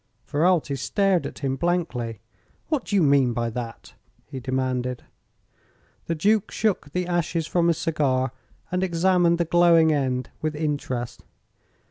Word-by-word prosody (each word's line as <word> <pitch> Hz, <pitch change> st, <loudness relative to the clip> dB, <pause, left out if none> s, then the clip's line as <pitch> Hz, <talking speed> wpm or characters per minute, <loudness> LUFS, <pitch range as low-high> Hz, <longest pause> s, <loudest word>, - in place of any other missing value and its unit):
Ferralti 160 Hz, -2 st, +1 dB
stared 190 Hz, -, +1 dB
at -, -, -10 dB
him 135 Hz, -2 st, -1 dB
blankly. 135 Hz, -, -2 dB, 0.5 s
"What 300 Hz, -6 st, 0 dB
do 205 Hz, -, -2 dB
you 190 Hz, -, +4 dB
mean 140 Hz, -4 st, +4 dB
by 115 Hz, 0 st, -2 dB
that?" 115 Hz, 0 st, -7 dB, 0.3 s
he 135 Hz, -, -7 dB
demanded. 130 Hz, -1 st, -2 dB, 1.0 s
The 165 Hz, -, -1 dB
Duke 205 Hz, +5 st, +2 dB
shook 200 Hz, -9 st, -1 dB
the 180 Hz, +2 st, -1 dB
ashes 170 Hz, -2 st, -1 dB
from 170 Hz, +1 st, +1 dB
his 170 Hz, -2 st, +2 dB
cigar 135 Hz, -6 st, 0 dB, 0.4 s
and 180 Hz, +1 st, 0 dB
examined 175 Hz, -1 st, +3 dB
the 170 Hz, -, 0 dB
glowing 165 Hz, -1 st, +5 dB
end 130 Hz, -3 st, -1 dB
with 155 Hz, -1 st, -2 dB
interest. 130 Hz, -6 st, -3 dB
155 Hz, 140 wpm, -24 LUFS, 130-175 Hz, 1.0 s, glowing